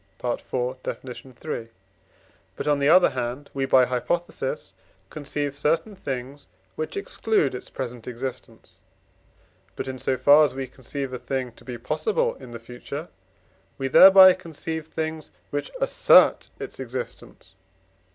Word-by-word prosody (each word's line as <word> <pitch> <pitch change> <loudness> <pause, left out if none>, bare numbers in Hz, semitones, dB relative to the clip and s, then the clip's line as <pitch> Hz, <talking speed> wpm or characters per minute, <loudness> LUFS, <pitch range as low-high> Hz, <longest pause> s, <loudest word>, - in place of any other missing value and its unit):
Def. 120 -1 -4
iii.); 125 -1 -5 0.9
but, - - -5
on 145 -1 +3
the 140 +1 +3
other 180 +2 +6
hand, 125 +3 -4
we 135 -1 -1
(by 130 -1 +6
hypothesis) 130 +8 -3 0.4
conceive 145 -1 -3
certain 165 +8 0
things, 135 -4 -6 0.3
which 155 - -4
exclude 220 - 0
its 125 - -7
present 120 -3 -6
existence. 125 +1 -7 1.0
But, - - -5
in 130 -1 -5
so 130 - 0
far 145 +4 +7
as 135 -4 0
we 135 0 -3
conceive 130 +1 -6
a 125 - -4
thing 130 -1 -3
to - - -19
be 125 -2 -6
possible 155 - 0
in 130 - -12
the 120 - -7
future, 125 +7 -8 0.7
we 135 0 -2
there 190 +8 +10
by 190 -1 +9
conceive 160 -3 -6
things 160 -1 -4 0.2
which 145 0 -3
assert - - +5
its - - -7
existence 485 - -7
(IV. - - -38
135 Hz, 140 wpm, -25 LUFS, 125-155 Hz, 1.0 s, there